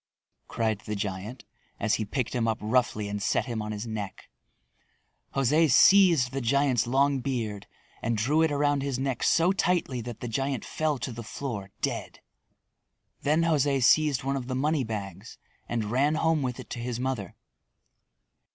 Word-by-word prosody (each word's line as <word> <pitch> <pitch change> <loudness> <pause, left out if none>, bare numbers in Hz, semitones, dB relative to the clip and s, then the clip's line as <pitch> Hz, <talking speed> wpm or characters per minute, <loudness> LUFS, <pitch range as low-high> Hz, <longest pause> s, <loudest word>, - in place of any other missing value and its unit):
cried 110 -3 -1
the 105 0 -5
giant 100 +4 -5 0.3
as 110 -2 +1
he - - -1
picked 120 +3 -2
him 120 -3 0
up 110 -1 0
roughly 110 -2 0
and 100 0 -4
set - - +1
him 115 -4 -3
on 105 0 -4
his 105 +1 -5
neck. 105 -4 -6 1.0
José 145 +4 +3
seized 170 -3 +6
the 135 0 -3
giant's 130 -1 +2
long 135 +2 +2
beard 115 -6 -3 0.3
and 115 0 -1
drew 140 +9 +2
it 160 -2 +3
around 145 -1 +1
his 135 -2 -2
neck 130 -2 -2
so 170 +3 +3
tightly 175 -9 0
that 115 -1 -7
the 120 - -5
giant 135 +3 -2
fell 155 -2 -1
to 125 +1 -4
the 115 0 -7
floor 110 -4 -5
dead. - - -3 1.0
Then 155 +3 +2
José 145 -5 +2
seized 150 0 +4
one 135 +1 -1
of 130 -3 -4
the 130 - -2
money 145 +2 +1
bags 100 -5 -6 0.3
and 110 -3 -2
ran 140 +5 +2
home 160 -1 +2
with 125 -2 -3
it - - -10
to 120 - -4
his 120 0 -3
mother. 125 -7 -3
125 Hz, 170 wpm, -27 LUFS, 110-140 Hz, 1.0 s, seized